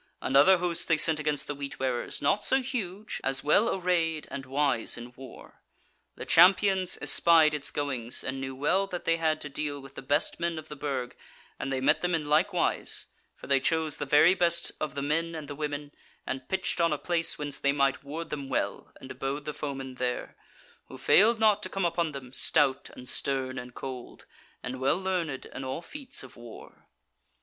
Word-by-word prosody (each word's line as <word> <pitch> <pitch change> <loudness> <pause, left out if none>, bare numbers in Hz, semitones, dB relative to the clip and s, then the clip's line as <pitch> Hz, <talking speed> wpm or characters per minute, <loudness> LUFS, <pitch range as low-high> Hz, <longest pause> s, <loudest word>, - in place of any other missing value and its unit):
Another 145 +8 +5
host 175 -1 -1
they 165 - +3
sent 155 0 +2
against 150 -1 -1
the - - -4
Wheat 140 -1 -6
wearers, 130 -2 -2
not 205 - +3
so 265 +5 +3
huge, 215 -6 -4
as 135 0 0
well 205 +10 +4
arrayed 170 -4 0
and 135 -1 -6
wise 135 -4 +1
in 120 +1 -9
war. 130 -2 -13 0.5
The - - -7
Champions 185 +1 +5
espied 160 -2 +5
its 150 -2 -2
goings, 130 -5 -3
and 135 +1 -4
knew 135 0 -5
well 185 +9 +1
that 180 -2 -6
they 165 - +2
had 160 -1 +1
to - - -5
deal 145 0 -4
with 135 0 -12
the - - -8
best 145 +4 0
men 170 -1 -1
of 155 - -8
the 150 - -7
Burg, 135 -3 -3 0.4
and 135 - -3
they 135 - 0
met - - +3
them 180 -1 +1
in 155 -2 -2
like 155 +7 +3
wise; 180 - 0 0.3
for - - -12
they 140 -1 +3
chose 160 +2 0
the 145 - -4
very 150 +5 +6
best 170 -2 +1
of 155 -2 -3
the 140 - -2
men 165 +3 -1
and 155 -2 -6
the 145 - -5
women, 145 0 -4 0.3
and 130 -1 -5
pitched 190 -2 -1
on 165 -1 +3
a 150 - 0
place 170 +2 -1
whence 145 -2 -4
they 140 - +2
might 140 -1 +1
ward 160 +4 -6
them 140 -2 -4
well, - - -2
and 130 - -10
abode 135 +3 -4
the 150 - -3
foemen 135 -3 -5
there; 125 -1 -2 0.5
who - - -10
failed 225 +3 +5
not 215 -2 +4
to 185 - -5
come 195 -1 -1
upon 170 -1 0
them, 130 -3 -9
stout 135 0 +2
and 125 - -11
stern 130 -1 -1
and 125 0 -10
cold, 130 -2 -8 0.4
and 130 0 -5
well 130 +5 +2
learned 180 -7 -2
in 135 - -8
all 130 +6 -4
feats 280 - -6
of 130 - -13
war. 120 -2 -13
150 Hz, 205 wpm, -28 LUFS, 135-170 Hz, 0.5 s, very